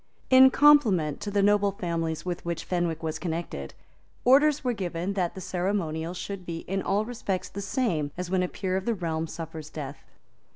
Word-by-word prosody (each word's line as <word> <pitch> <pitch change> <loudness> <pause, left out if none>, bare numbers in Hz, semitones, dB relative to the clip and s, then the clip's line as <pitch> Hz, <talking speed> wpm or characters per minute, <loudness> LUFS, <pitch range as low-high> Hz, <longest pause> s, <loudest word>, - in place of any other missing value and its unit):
In 260 0 +9
compliment 235 - +4
to 205 - -3
the 200 -1 +1
noble 205 -1 +3
families 165 -5 -3
with 180 -1 -3
which 170 -1 -3
Fenwick 175 -3 -1
was 160 0 -3
connected, 165 - -4 0.5
orders 285 +4 +5
were 250 -2 +1
given 180 -2 -3
that 180 -3 -1
the 190 - -7
ceremonial 175 -3 -2
should 195 +1 -5
be 170 -1 -5
in 195 +1 -3
all 205 +3 0
respects 220 -6 -3
the 200 - -6
same 195 - 0
as 180 0 -3
when 190 -1 +2
a 180 - +1
peer 185 0 -3
of 190 - -4
the 235 - +1
realm 165 -3 -2
suffers 160 -1 -7
death. 140 -3 -7
180 Hz, 190 wpm, -27 LUFS, 165-205 Hz, 0.5 s, In